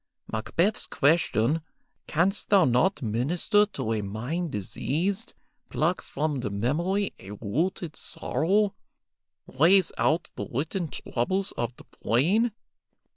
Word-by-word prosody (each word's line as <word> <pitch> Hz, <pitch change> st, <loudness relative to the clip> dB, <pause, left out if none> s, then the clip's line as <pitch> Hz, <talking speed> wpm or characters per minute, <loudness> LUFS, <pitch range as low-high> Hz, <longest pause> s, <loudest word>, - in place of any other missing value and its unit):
Macbeth's 170 Hz, -, 0 dB
question, 145 Hz, -2 st, +2 dB, 0.5 s
'Canst 185 Hz, +6 st, 0 dB
thou 195 Hz, -4 st, +6 dB
not 130 Hz, +6 st, +2 dB
minister 160 Hz, -, +2 dB
to 115 Hz, -, -3 dB
a 110 Hz, -, -1 dB
mind 120 Hz, -, -3 dB
diseased; 165 Hz, -, -2 dB, 0.3 s
pluck 170 Hz, +4 st, 0 dB
from 145 Hz, -1 st, -2 dB
the 120 Hz, -, -2 dB
memory 165 Hz, -, 0 dB
a 95 Hz, -, -11 dB
rooted 155 Hz, -, -2 dB
sorrow; 200 Hz, +5 st, 0 dB, 0.7 s
raze 180 Hz, +8 st, +4 dB
out 165 Hz, +2 st, +1 dB
the -, -, -5 dB
written 160 Hz, +7 st, -2 dB
troubles 185 Hz, +9 st, -2 dB
of 120 Hz, 0 st, -3 dB
the -, -, -14 dB, 0.2 s
brain?' 190 Hz, -, +3 dB
160 Hz, 115 wpm, -27 LUFS, 120-190 Hz, 0.7 s, thou